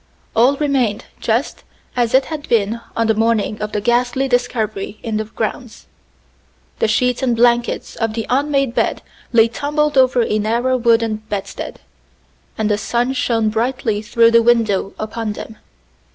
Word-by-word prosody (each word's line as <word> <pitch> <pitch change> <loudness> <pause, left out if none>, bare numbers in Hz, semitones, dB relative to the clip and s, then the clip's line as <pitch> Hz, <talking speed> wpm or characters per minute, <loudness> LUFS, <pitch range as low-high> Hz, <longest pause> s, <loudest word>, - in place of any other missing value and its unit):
All 250 +5 +4
remained 265 -8 0
just - - -1 0.3
as 240 -1 +1
it 265 - +4
had 310 -2 -7
been 225 0 +1 0.2
on 230 - +2
the 220 - +3
morning 220 -1 0
of 210 0 -3
the 210 - -1
ghastly 245 +4 +1
discovery 220 -5 -1
in 225 -2 -2
the 215 - -2
grounds. 220 +2 -5 0.9
The - - +2
sheets 250 +3 +1
and 250 -3 +1
blankets 240 +1 +1
of 225 -2 -1
the 225 -2 -2
unmade 275 0 +1
bed - - 0 0.3
lay 230 -2 +5
tumbled 295 +3 0
over 255 -2 +4
a 215 -1 0
narrow 235 +5 +1
wooden 230 -2 +2
bedstead, 200 -2 -5 0.8
and 220 - 0
the 210 -1 +1
sun 245 +4 0
shone 225 -4 +1
brightly 225 -1 -1
through 230 +1 +3
the 230 0 +6
window 225 -5 +1
upon 215 0 -4
them. 220 +1 -9
230 Hz, 155 wpm, -18 LUFS, 215-250 Hz, 0.9 s, the